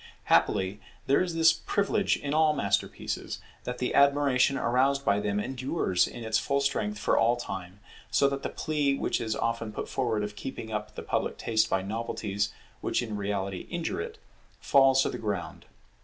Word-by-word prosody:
Happily 95 +2 +2 0.3
there 140 - +3
is 175 -2 -2
this 160 0 +6
privilege 200 +3 0
in 140 0 -3
all 155 -1 +4
masterpieces, 100 -5 -2 0.3
that 125 0 -3
the 125 - -1
admiration 140 -1 +4
aroused 135 +3 +2
by 100 - +3
them 105 0 -1
endures 130 - 0
in 120 - -8
its 110 0 +1
full 140 0 0
strength 105 -6 -1
for 105 - +2
all 120 +1 +4
time; 95 -4 -6 0.3
so 140 - +4
that 140 0 -2
the - - -3
plea 145 -3 0
which - - -1
is 110 -2 -1
often 115 -1 -2
put - - -5
forward 115 -5 -1
of 105 0 -5
keeping 110 -2 -6
up 105 0 -4
the - - -6
public - - -1
taste 110 -1 +1
by 95 - +1
novelties 105 -1 -2 0.3
which - - 0
in 110 -3 -4
reality 100 -2 -3
injure 170 - -2
it, 450 0 -6 0.4
falls 135 -1 +5
to - - 0
the - - -5
ground. 100 -5 -4
115 Hz, 180 wpm, -28 LUFS, 105-140 Hz, 0.4 s, this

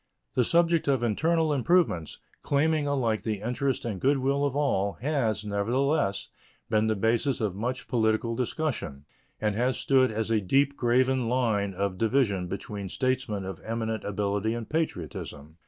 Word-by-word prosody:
The 125 - +3
subject 170 +3 +2
of 135 -4 +2
internal 160 +7 +1
improvements, 145 - +1 0.2
claiming 150 +1 +1
alike 120 -6 0
the 110 -3 -2
interest 125 +4 -1
and 105 -6 -4
good 140 +2 +3
will 140 +2 +1
of 140 -1 -1
all, 100 -9 +1
has, 115 -6 -1
nevertheless, 115 +3 0 0.4
been 110 0 +3
the 110 - +1
basis 115 +6 +1
of 105 -5 -1
much 120 +6 -4
political 115 -1 +1
discussion 120 - -3 0.3
and 105 -1 0
has 125 +4 0
stood 130 -2 +3
as 110 +1 -2
a 110 -2 +2
deep 140 +8 +2
graven 125 0 +2
line 110 -6 0
of 95 -1 -2
division 110 -6 +1
between 100 +1 -5
statesmen 130 -6 -1
of 95 - -6
eminent 110 -1 -3
ability 100 +2 -1
and 115 -2 -6
patriotism. 80 - -4
115 Hz, 155 wpm, -27 LUFS, 105-135 Hz, 0.4 s, The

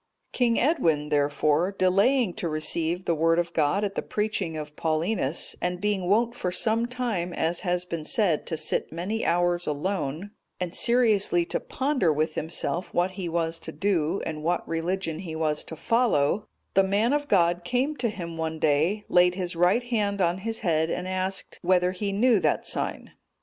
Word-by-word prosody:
King 240 -2 +2
Edwin, 165 - +1
therefore, 150 +4 +1
delaying 200 +4 +3
to 170 - -3
receive 160 +3 -1
the 170 - +2
Word 165 +1 +2
of 175 0 -1
God 160 +6 +1
at 200 -1 -1
the - - -2
preaching 210 -6 -2
of 150 -1 -7
Paulinus, 160 -1 -1
and 180 0 -1
being 200 -2 -1
wont 230 +4 +3
for 185 -7 -3
some 225 +5 +1
time, 235 -8 -2
as 170 +1 -1
has 180 0 -1
been 170 -3 -5
said, 170 -1 +1
to 160 - -2
sit 155 - -1
many 190 +7 -3
hours 175 0 +1
alone, 160 +3 -3 0.3
and 180 -1 -3
seriously 215 -8 +3
to - - -2
ponder 265 - 0
with 155 +1 0
himself 170 +3 -3
what 180 +2 +2
he 185 -2 -5
was 165 0 -1
to 160 - -8
do, 170 0 0
and 155 -1 -4
what 175 +3 -1
religion 165 0 -2
he 170 -4 -6
was 155 -1 0
to 160 - -8
follow, 210 - +1 0.3
the 195 - +5
man 205 +6 +1
of 290 0 0
God 175 -4 +2
came 255 - 0
to 245 -2 0
him 170 -5 -6
one 160 0 -3
day, 160 +8 +1
laid 180 0 +4
his 180 -2 -3
right 180 +8 +3
hand 210 -5 -1
on 175 0 +1
his 225 +3 -4
head, 160 -2 +1
and 180 +2 -3
asked, 185 +1 -2
whether 180 0 +2
he 200 +2 -3
knew 220 +2 +3
that - - 0
sign? - - -3
180 Hz, 180 wpm, -26 LUFS, 165-205 Hz, 0.3 s, the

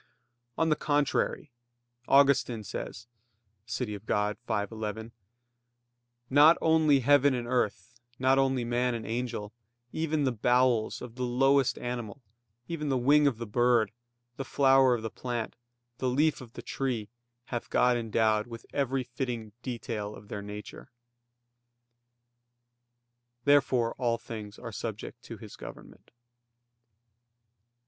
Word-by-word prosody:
On 165 - +2
the 155 - +4
contrary, 145 -1 0 0.6
Augustine 135 -5 +4
says 100 +1 -6 0.6
(De - - -11
Civ. 105 -5 -3
Dei 105 0 +1
v, 105 -3 0
11): 110 +1 -5 1.2
"Not 145 +5 +7
only 155 -4 +4
heaven 145 +1 +4
and 120 -1 -3
earth, 120 -2 -2 0.2
not 130 +1 +3
only 135 -2 +1
man 120 +1 0
and 115 - -5
angel, 115 -3 -3 0.4
even 155 -2 0
the 130 - +2
bowels 120 0 +2
of 120 -2 -8
the 125 - -8
lowest 135 +2 +3
animal, 120 -1 -5 0.5
even 150 -3 -3
the 135 - +2
wing 145 +4 +4
of 130 -6 0
the 115 - -5
bird, 120 0 +2 0.5
the 135 - -3
flower 135 -2 +4
of 110 - -6
the 110 - -4
plant, 120 -3 -4 0.4
the 130 - 0
leaf 150 +4 +2
of 120 -2 -12
the - - -9
tree, 125 -6 -2 0.5
hath 120 - -3
God 125 0 +3
endowed 110 -2 +1
with 115 -1 -9
every 135 -2 0
fitting 120 -3 -4
detail 115 -4 -4
of 105 - -14
their 100 - -5
nature." 105 +4 -9 2.5
Therefore 130 -5 +3
all 120 -2 +1
things 105 -3 -8
are - - -7
subject - - -6
to - - -8
His - - -11
government. - - -12
125 Hz, 130 wpm, -29 LUFS, 110-135 Hz, 2.5 s, Not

